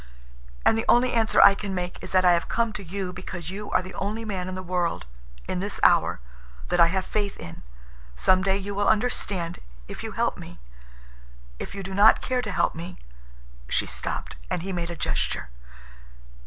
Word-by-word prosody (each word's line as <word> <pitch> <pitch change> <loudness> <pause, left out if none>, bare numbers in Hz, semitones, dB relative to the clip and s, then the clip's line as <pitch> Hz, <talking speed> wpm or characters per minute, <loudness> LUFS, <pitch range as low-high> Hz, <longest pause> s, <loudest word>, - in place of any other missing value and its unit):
And - - +5
the 225 - -1
only 245 +1 +4
answer 225 -2 +2
I 200 - +9
can 195 -1 -4
make 180 0 -4
is - - -4
that 185 -1 +4
I 180 - +7
have 170 - 0
come 230 -2 0
to 205 - -6
you 185 +1 -4
because 180 -2 -6
you 205 +2 -6
are - - +2
the 185 - -9
only 215 +3 -3
man 190 -4 -3
in 185 - -4
the 185 - -5
world—in - - -4
this 200 +2 -1
hour—that - - +1
I 170 - +8
have 185 +2 -1
faith 205 -2 -2
in. 85 - -9 0.5
Some 185 - +4
day 195 0 +2
you 200 +1 -5
will 205 +1 0
understand, 205 -6 0 0.3
if - - -8
you - - -5
help - - 0
me. - - -10 1.0
If - - -6
you 195 - -5
do 190 +1 -6
not 205 +3 +6
care 255 -1 -1
to 215 - -4
help - - +1
me—" 170 +2 -7 0.7
She - - +2
stopped, - - -4
and 170 - -2
he 195 0 -4
made 170 -1 -3
a 170 - -5
gesture. 150 - -2
185 Hz, 195 wpm, -25 LUFS, 170-205 Hz, 1.0 s, I